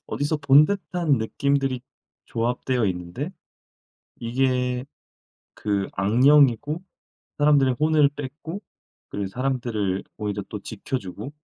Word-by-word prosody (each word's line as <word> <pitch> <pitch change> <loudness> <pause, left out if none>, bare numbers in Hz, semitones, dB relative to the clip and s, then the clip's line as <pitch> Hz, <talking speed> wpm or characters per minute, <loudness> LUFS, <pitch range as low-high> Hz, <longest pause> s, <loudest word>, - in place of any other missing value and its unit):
어디서 145 +2 -1
본 140 +1 +7
듯한 180 -5 -1
느낌들이 135 +3 0 0.5
조합되어 120 0 0
있는데 90 - -4 0.9
이게 125 +1 0 0.7
그 100 -2 -1
악령이고 135 - +4 0.6
사람들의 140 -4 +4
혼을 155 -1 +4
뺏고 150 +7 -6 0.5
그리고 100 -1 -3
사람들을 120 -5 -1
오히려 105 -1 -3
또 105 - -5
지켜주고 110 +2 -5
130 Hz, 245 characters per minute, -24 LUFS, 110-145 Hz, 0.9 s, 본